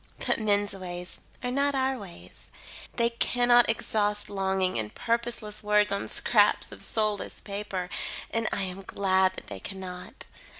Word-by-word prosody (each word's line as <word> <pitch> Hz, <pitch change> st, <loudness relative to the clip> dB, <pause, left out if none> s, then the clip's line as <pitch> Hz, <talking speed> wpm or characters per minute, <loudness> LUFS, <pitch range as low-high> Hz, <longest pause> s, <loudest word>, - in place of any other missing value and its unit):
But -, -, +3 dB
men's 205 Hz, -1 st, +2 dB
ways 180 Hz, -2 st, -6 dB, 0.2 s
are 245 Hz, -, -1 dB
not 280 Hz, +2 st, +1 dB
our 265 Hz, 0 st, +1 dB
ways. 180 Hz, -4 st, -12 dB, 0.5 s
They 235 Hz, 0 st, +2 dB
cannot 245 Hz, 0 st, +4 dB
exhaust 210 Hz, -2 st, +1 dB
longing 190 Hz, -3 st, 0 dB
in 110 Hz, -2 st, -1 dB
purposeless 230 Hz, -, -2 dB
words 210 Hz, 0 st, +3 dB
on 200 Hz, -, -1 dB
scraps -, -, +3 dB
of -, -, -8 dB
soulless 215 Hz, -2 st, -1 dB
paper, 200 Hz, -3 st, -4 dB, 0.4 s
and 225 Hz, -1 st, 0 dB
I 200 Hz, -, +1 dB
am 190 Hz, +1 st, -2 dB
glad 190 Hz, -1 st, +2 dB
that -, -, -8 dB
they 100 Hz, -2 st, -7 dB
cannot. 185 Hz, -, -7 dB
205 Hz, 145 wpm, -28 LUFS, 190-230 Hz, 0.5 s, cannot